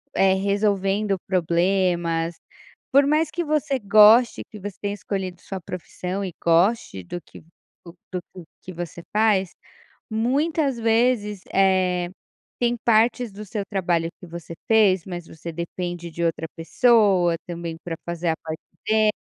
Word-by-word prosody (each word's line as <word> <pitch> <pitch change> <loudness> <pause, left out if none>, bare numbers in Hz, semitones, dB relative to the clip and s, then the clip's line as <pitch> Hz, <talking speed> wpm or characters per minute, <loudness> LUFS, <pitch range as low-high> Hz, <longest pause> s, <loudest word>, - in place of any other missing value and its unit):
eh, 190 0 +4
resolvendo 200 0 +1
problemas, 175 -2 +1 0.6
por 280 +1 +5
mais 305 +1 +2
que 345 +3 -2
você 295 -3 0
goste 215 +3 +6
que 210 - -9
você 200 -1 -7
tenha 205 0 -2
escolhido 190 -3 -4
sua 195 - -6
profissão 180 +2 -5
e 180 - -6
goste 170 - +2
do 175 - -6
que - - -15 0.4
do 170 0 -12 0.4
do 180 -3 -10 0.2
que 185 - -9
você 170 0 -6
faz, 210 -4 +3 0.6
muitas 275 +4 0
vezes, 225 -3 +1
eh, 185 -2 +2 0.5
tem 240 0 +1
partes 235 +1 +3
do 205 +2 -9
seu 205 +1 -4
trabalho 175 -4 0
que - - -9
você 170 0 -8 0.2
fez 205 -5 +4
mas 175 -3 -7
você 160 +1 -8
depende 170 +1 -5
de 170 +1 -4
outra 165 -1 -1
pessoa 195 -2 +3
também 170 -1 -5
para 170 -2 -4
fazer 170 0 -2
a 160 - +1
parte 160 0 -6 0.3
deles, 215 -1 +4
190 Hz, 145 wpm, -23 LUFS, 170-220 Hz, 0.6 s, goste